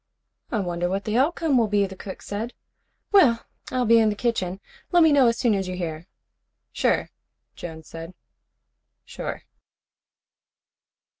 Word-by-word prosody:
"I 230 - 0
wonder 175 -1 -2
what 195 +2 -1
the 215 0 -1
outcome 290 +1 +2
will 225 - +3
be," 205 -1 +2
the 190 0 -8
cook 190 0 -8
said. 220 +4 -4 0.6
"Well, 270 - +5 0.2
I'll 250 -1 0
be 230 +1 +6
in 220 -1 +4
the 210 - -1
kitchen. 195 -5 -1 0.3
Let 350 -2 +6
me 320 - +6
know 275 -4 +6
as 230 0 +2
soon 235 -3 +2
as 195 -2 -1
you 185 - -4
hear." 165 -1 -5 0.6
"Sure," - - +1 0.4
Jones 160 -2 -8
said. 165 +2 -9 0.9
"Sure." - - -6
210 Hz, 150 wpm, -24 LUFS, 180-245 Hz, 0.9 s, be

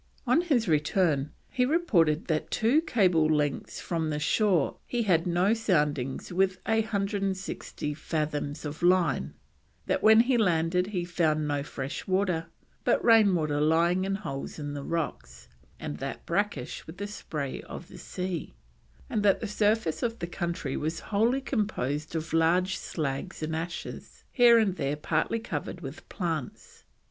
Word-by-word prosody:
On 255 +7 +4
his 275 - +1
return 150 -2 +2 0.2
he 250 - 0
reported 205 - +2
that 155 -2 +1
at - - -30
two 245 +8 +3
cable 185 - +3
lengths 150 -2 0
from 165 -2 -2
the 150 - -1
shore 170 +1 +2
he 240 -1 0
had 175 -5 +2
no 180 +4 +3
soundings 150 - 0
with 190 0 +2
a 225 0 +3
160 195 -7 -3
fathoms 150 -1 -3
of 150 +2 -6
line; 175 - +2 0.5
that - - 0
when 220 +1 +7
he 245 0 +2
landed 180 -2 +2
he 185 -4 -2
found 155 -3 +1
no 145 -1 0
fresh 140 -1 -5
water, 185 -4 +1 0.4
but - - +2
rain 220 -5 +6
water 150 -3 0
lying 170 +4 +3
in 195 +1 -1
holes 140 -9 -5
in 145 -2 -5
the 145 - -4
rocks, 65 - -4 0.3
and 75 +1 -5
that - - -5
brackish - - -2
with 160 +3 -10
the 200 - -4
spray 150 -9 -5
of - - -9
the - - -12
sea, 180 -1 -5 0.5
and 230 -6 -1
that 200 -2 +4
the - - -4
surface 210 -5 +1
of 230 -1 -1
the 170 - -3
country 170 -5 -3
was 160 +2 -2
wholly 235 +6 +3
composed 165 - -2
of 160 0 -3
large 175 +3 +3
slags 140 -1 -4
and 160 +1 -2
ashes, 165 +2 -6
here 240 -2 +7
and 200 -5 +2
there 140 +1 -1
partly 150 +8 0
covered 225 -5 -5
with 145 +3 -9
plants. 165 - -5
175 Hz, 160 wpm, -28 LUFS, 150-205 Hz, 0.5 s, when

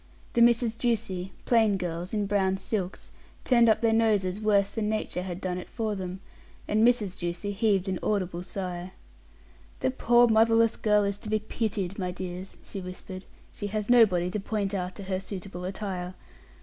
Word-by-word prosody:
The 235 - +3
Misses 235 -1 +4
Ducie, 220 -6 -1
plain 220 -4 +4
girls, 175 0 -4
in 210 -2 0
brown 195 -1 +1
silks, 190 -1 -4 0.3
turned 235 -3 +5
up 220 - +3
their 225 -1 +3
noses 210 -3 +2
worse 200 -2 +3
than 215 -2 -1
nature 215 -4 -2
had 180 -1 -5
done 180 -1 -3
it - - -9
for 220 -3 -2
them, 190 -1 -5 0.5
and 215 +1 +2
Mrs. 225 -6 +2
Ducie 175 +3 -3
heaved 200 -2 +1
an 185 -2 -1
audible 185 -4 -1
sigh. 180 -1 -5 0.9
"The 260 - +2
poor 240 -1 +4
motherless 225 0 +4
girl 210 -1 +3
is 200 0 -1
to 215 - -6
be 215 - +2
pitied, 205 -3 -3
my 180 -1 -1
dears," 180 +1 -6
she 195 - -7
whispered; 185 +1 -8 0.3
"she 205 - -4
has 215 +2 -2
nobody 185 -7 +5
to 210 - -2
point 205 0 -2
out 185 -1 -3
to 200 - -8
her 190 -1 -2
suitable 190 -2 -7
attire. 185 -2 -4
200 Hz, 175 wpm, -27 LUFS, 185-220 Hz, 0.9 s, turned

